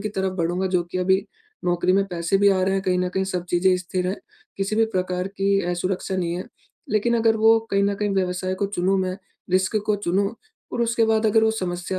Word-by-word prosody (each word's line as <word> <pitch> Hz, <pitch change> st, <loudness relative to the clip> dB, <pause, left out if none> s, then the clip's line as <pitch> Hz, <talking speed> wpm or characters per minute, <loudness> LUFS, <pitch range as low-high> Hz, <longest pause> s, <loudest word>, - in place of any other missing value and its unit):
की 215 Hz, -, -2 dB
तरफ 190 Hz, -1 st, 0 dB
बढ़ूँगा 175 Hz, +3 st, 0 dB
जो 175 Hz, -, +1 dB
कि, 180 Hz, +1 st, -5 dB
अभी 190 Hz, +2 st, +2 dB, 0.4 s
नौकरी 175 Hz, +1 st, +2 dB
में 195 Hz, +1 st, +3 dB
पैसे 175 Hz, +1 st, 0 dB
भी 200 Hz, 0 st, +5 dB
आ 185 Hz, -1 st, +2 dB
रहे 190 Hz, +1 st, +1 dB
हैं, 195 Hz, -, 0 dB
कहीं 180 Hz, -1 st, +1 dB
न 180 Hz, 0 st, 0 dB
कहीं 190 Hz, +1 st, -1 dB
सब 180 Hz, -2 st, -3 dB
चीज़ें 185 Hz, +1 st, +3 dB
स्थिर 180 Hz, 0 st, -3 dB
हैं, 195 Hz, -, -2 dB, 0.4 s
किसी 200 Hz, +2 st, -1 dB
भी 225 Hz, -, +4 dB
प्रकार 185 Hz, 0 st, -1 dB
की 195 Hz, 0 st, +1 dB
असुरक्षा 185 Hz, +1 st, -2 dB
नहीं 170 Hz, -2 st, -1 dB
है। 180 Hz, -, -5 dB, 0.5 s
लेकिन 235 Hz, +3 st, +2 dB
अगर 225 Hz, -1 st, +3 dB
वो 225 Hz, +1 st, +5 dB
कहीं 200 Hz, 0 st, +2 dB
न 200 Hz, -, +1 dB
कहीं 205 Hz, 0 st, -1 dB
व्यवसाय 185 Hz, 0 st, -1 dB
को -, -, +2 dB
चुनूँ 195 Hz, 0 st, 0 dB
मैं, 185 Hz, 0 st, -2 dB, 0.3 s
रिस्क 185 Hz, +3 st, +2 dB
को 210 Hz, -1 st, +2 dB
चुनूँ 200 Hz, +2 st, 0 dB, 0.4 s
और 240 Hz, -, -2 dB
उसके 230 Hz, 0 st, +2 dB
बाद 220 Hz, 0 st, +2 dB
अगर 220 Hz, +1 st, +4 dB
वो 220 Hz, -, +4 dB
समस्या 185 Hz, -2 st, -3 dB
190 Hz, 230 wpm, -23 LUFS, 180-205 Hz, 0.5 s, भी